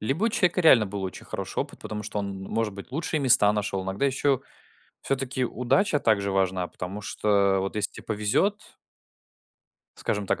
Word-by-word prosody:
либо 135 - 0
у - - +4
человека 185 -6 +2
реально 130 -9 +7
был 100 0 -5
очень 95 - -6
хороший - - -5
опыт, - - -6
потому 105 0 -5
что 105 0 -4
он, 100 -1 -4
может 110 +2 -2
быть, 100 - -10
лучшие 160 +1 -1
места 120 -6 +5
нашел, 100 -2 -2
иногда 95 +6 -2
ещё 135 0 +1 0.6
всё-таки 130 -1 -1
удача 150 - +1
также 100 -5 +2
важна, 95 -2 +1
потому 95 +3 -6
что 100 -2 +2
вот 95 +2 -3
если 105 -1 0
те - - -10
повезет 110 - -1 1.2
скажем 105 -1 -2
так, - - 0
105 Hz, 175 wpm, -26 LUFS, 100-135 Hz, 1.2 s, реально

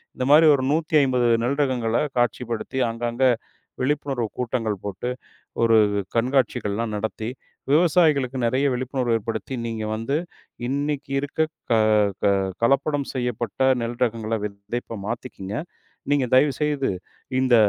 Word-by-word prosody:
இந்த 125 - -2
மாதிரி 155 +2 +8
ஒரு 130 - -2
150 145 -6 +2 0.2
நெல் 140 +4 0
ரகங்களை 120 -4 +1 0.2
காட்சிப்படுத்தி, 120 +1 -1
அங்க, 115 +1 -6
அங்க 130 +3 +1 0.6
விழிப்புணர்வு 135 -3 0
கூட்டங்கள் 115 -4 -1
போட்டு, 100 +5 -4 0.6
ஒரு 115 -1 +5 0.4
கண்காட்சிகள் 120 -4 +1
எல்லாம் 115 -1 -2
நடத்தி 110 +1 -3 0.4
விவசாயிகளுக்கு 150 -5 +3
நெறைய 130 +4 +1
விழிப்புணர்வு 125 -1 -1
ஏற்படுத்தி, 115 +4 -4
"நீங்க 115 -2 -3
வந்து 115 +6 -1 0.5
இன்னைக்கு 140 +1 -2
இருக்க 145 +2 -5 0.3
க - - +5 0.5
க - - +5 0.3
கலப்படம் 140 +3 +2
செய்யப்பட்ட 120 -2 -3 0.2
நெல் 120 +1 -4
ரகங்களை 115 -1 -2
விதைப்ப 105 +3 -5
மாத்திக்கங்க. 110 -4 -5 0.6
நீங்க 145 -3 +3
தயவுசெய்து 145 0 +2 0.5
இந்த 130 -2 +3
125 Hz, 120 wpm, -23 LUFS, 115-140 Hz, 0.6 s, மாதிரி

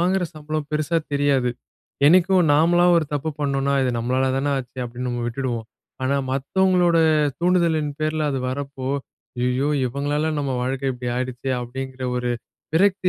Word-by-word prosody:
வாங்குற 185 +1 +2
சம்பளம் 155 -1 -4
பெருசா 155 +2 +1
தெரியாது. 140 -3 +2 0.6
என்னைக்கும் 180 +1 +5
நாமளா 170 +4 +4
ஒரு 165 - +2
தப்பு 150 +2 -1
பண்ணோம்ன்னா, 140 -1 +1
இது 130 - +1
நம்மளால 130 +3 +1
தான 140 +1 0
ஆச்சு 130 0 -8
அப்படின்னு 125 +1 -5
நம்ம 120 -1 -2
விட்டுடுவோம். 120 -2 -3 0.4
ஆனா, 140 +2 +1 0.2
மத்தவங்களோட 175 +5 +2 0.4
தூண்டுதலின் 170 -4 +2
பேரில 155 -1 0
அது 135 - -1
வரப்போ, 135 0 -4 0.5
"ஐயயோ! 125 +3 +1 0.2
இவங்களால 145 +4 -1
நம்ம 140 -2 -1
வாழ்க்க 135 +1 -1
இப்படி 125 0 -4
ஆயிடுச்சே" 130 +1 -2
அப்படிங்கற 130 +2 -6
ஒரு 125 0 -1 0.4
விரக்தி 190 +1 +3
140 Hz, 140 wpm, -22 LUFS, 130-160 Hz, 0.6 s, என்னைக்கும்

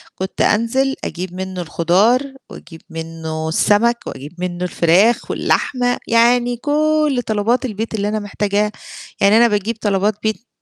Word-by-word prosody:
كنت 190 +1 -4
أنزِل 260 +5 +1
أجيب 180 0 -5
منه 185 0 -5
الخضار 180 - +2 0.3
واجيب 165 -2 -12
منه 160 -1 -5
السمك 220 +8 +3
واجيب 140 +4 -8
منه 180 0 -3
الفراخ 180 +7 +2
واللحمة، 245 -2 0
يعني 240 +1 +3
كل 300 0 +1
طلبات 220 +4 +1
البيت 225 -1 -4
اللي 205 -1 -1
أنا 215 +1 -1
محتاجاها، 205 0 -1 0.5
يعني 200 +2 +5
أنا 235 +1 +6
باجيب 210 +1 -1
طلبات 205 0 +1
بيت 220 +2 -2
210 Hz, 135 wpm, -18 LUFS, 180-235 Hz, 0.5 s, أنا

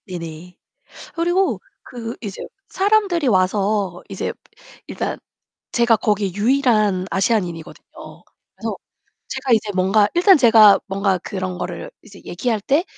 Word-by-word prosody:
네네. 170 -1 -8 0.6
그리고 350 +3 0 0.2
그 235 -2 -7
이제 205 -5 -7 0.3
사람들이 390 -6 +1
와서 195 -2 +1
이제 - - -3 0.6
일단 - - -4 0.5
제가 235 -1 +3
거기 205 -3 -1
유일한 215 -5 +2
아시아인이거든요. 180 -5 -2 0.7
그래서 - - -4 0.5
제가 260 - -2
이제 215 -2 +2
뭔가 195 +3 +3
일단 365 +3 +6
제가 220 -6 +6
뭔가 195 -1 0
그런 185 0 -5
거를 - - -6
이제 200 -3 -15
얘기할 220 +4 -2
때 285 - +1
210 Hz, 270 characters per minute, -20 LUFS, 185-245 Hz, 0.7 s, 일단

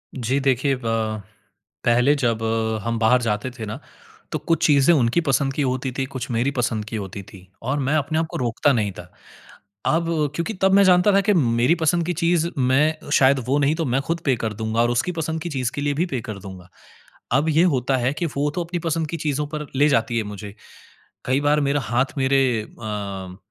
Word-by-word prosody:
जी 130 +1 0
देखिए 135 0 +1
ब 110 -2 -1 0.6
पहले 120 +4 +4
जब 115 -5 0 0.4
हम 115 +1 -1
बाहर 120 +3 +4
जाते 110 +1 -1
थे 120 -3 -7
ना 105 - -6 0.5
तो - - -2
कुछ 165 0 0
चीज़ें 145 +1 +5
उनकी 125 +3 +2
पसंद 135 -3 +1
की 145 - -2
होती 130 -1 -1
थी, 135 +1 -2
कुछ 130 -1 -6
मेरी 120 +4 +1
पसंद 115 -5 -1
की 110 - -6
होती 100 -1 -6
थी 95 -1 -15
और 130 +5 -1
मैं 140 +2 0
अपने 155 +1 0
आप 165 - -1
को - - -4
रोकता 125 +4 +1
नहीं 105 -5 0
था। - - -7 0.8
अब 165 +1 +2 0.3
क्योंकि 170 +8 -3
तब 190 0 +4
मैं 200 0 +6
जानता 180 +2 +5
था 195 - +5
कि 205 +1 +2
मेरी 125 -2 +3
पसंद 170 0 +1
की 180 - 0
चीज़ 170 -1 +2
मैं 145 +5 +1
शायद 135 0 +5
वो 135 +3 +2
नहीं 145 +1 +2
तो 165 0 -2
मैं 130 -1 +1
खुद 170 0 0
पे 135 -3 +2
कर 110 -1 -3
दूँगा 110 +1 -2
और 120 - +2
उसकी 120 +9 0
पसंद 160 -1 -3
की 175 - -4
चीज़ 130 -3 -2
के - - -3
लिए 145 0 0
भी - - 0
पे 130 -8 -3
कर 105 -2 -5
दूँगा। 95 -2 -11 0.7
अब 150 +4 0
ये 160 +1 +4
होता 130 +1 +1
है 125 +1 0
कि 170 - -2
वो 145 +1 +1
तो 175 - -2
अपनी 175 +1 -4
पसंद 165 -1 -1
की 170 - -3
चीज़ों 150 -2 -2
पर 150 -1 -4
ले 145 +2 +4
जाती 115 -4 +1
है 110 - -1
मुझे। 105 0 -8 0.7
कई 130 +2 +1
बार 145 +1 +2
मेरा 145 0 +1
हाथ 125 +5 -1
मेरे 135 0 +3
अ, 100 -4 -6
135 Hz, 220 wpm, -22 LUFS, 115-155 Hz, 0.8 s, मैं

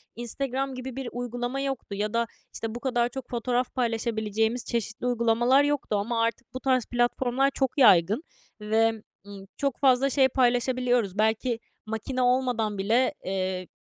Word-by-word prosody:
Instagram 265 +3 -3
gibi 255 0 -6
bir 265 -2 -4
uygulama 245 +2 -3
yoktu 270 -7 -4
ya 210 +2 -2
da, 235 0 +1 0.3
işte, 225 0 -5
bu 240 - -4
kadar 240 -2 0
çok 260 0 -8
fotoğraf 245 +1 -1
paylaşabileceğimiz 225 -1 -1
çeşitli 230 +1 -3
uygulamalar 240 +3 +3
yoktu 290 -6 0
ama 230 +3 -1
artık 230 +2 -3
bu 255 - -4
tarz 255 -3 +1
platformlar 245 +2 +1
çok 265 0 -1
yaygın 205 - +5 0.4
ve, 220 +2 +3 0.4
ımm, 200 -1 -10
çok 275 -3 -1
fazla 270 0 +4
şey 270 -1 +4
paylaşabiliyoruz. 245 -4 +1
Belki 225 +2 +1 0.3
makine 220 +4 -3
olmadan 245 -4 +1
bile, 230 +8 +2
eee, 185 -1 -2
240 Hz, 150 wpm, -26 LUFS, 220-255 Hz, 0.4 s, yaygın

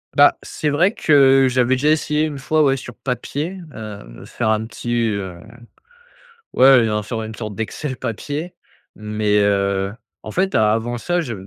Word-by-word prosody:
Bah, - - +6
c'est 150 - -3
vrai 175 +9 +2
que 135 - +5
j'avais 125 0 +2
déjà 145 +4 +1
essayé 150 0 +1
une 145 -3 -3
fois, 155 +2 +1
ouais, 135 -1 +2
sur 125 -2 -9
papier, 150 +8 -4 0.2
heu, 105 - -9
faire 110 - -2
un 110 0 +1
petit, 120 +1 -5 0.2
heu 95 -4 -4 1.2
ouais, 130 - +4 0.2
heu, - - -1
un 105 0 -1
sur 110 +1 -4
une 110 0 -7
sorte 105 -3 -6
d'excel 130 +5 -4
papier 145 - -5 0.4
mais 105 -1 0
heu, 100 -1 +1 0.3
en - - -8
fait 190 +1 0
avant 110 +3 +1
ça, 175 +9 -1
je 120 -7 -5
120 Hz, 165 wpm, -20 LUFS, 105-145 Hz, 1.2 s, Bah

